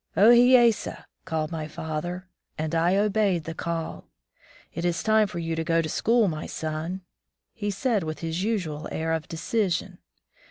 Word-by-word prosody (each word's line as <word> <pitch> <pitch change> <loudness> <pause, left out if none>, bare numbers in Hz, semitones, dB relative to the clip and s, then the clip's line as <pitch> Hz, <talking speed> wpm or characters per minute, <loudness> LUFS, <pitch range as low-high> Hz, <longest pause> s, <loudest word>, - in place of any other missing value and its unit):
"0 215 +4 +7
hee 245 +2 +7
ye 240 -1 +6
sa!" 210 - -7 0.2
called 160 -3 -2
my 160 -2 -4
father, 160 +4 -5 0.3
and 155 +1 -3
I 170 +3 +3
obeyed 200 -4 +2
the 165 - -5
call. 165 0 -4 0.7
"It 170 - -4
is 175 -1 0
time 215 -1 +4
for 185 - -7
you 165 -1 -2
to 160 - -1
go 165 0 +2
to 165 - 0
school, 230 +5 +3
my 155 -3 -3
son," 160 +4 -4 0.5
he 205 -3 -3
said, 205 +2 0
with 155 -1 -4
his 165 +1 -2
usual 180 -9 -2
air 160 0 -1
of 160 -1 -2
decision. 180 0 -1
170 Hz, 175 wpm, -26 LUFS, 160-205 Hz, 0.7 s, 0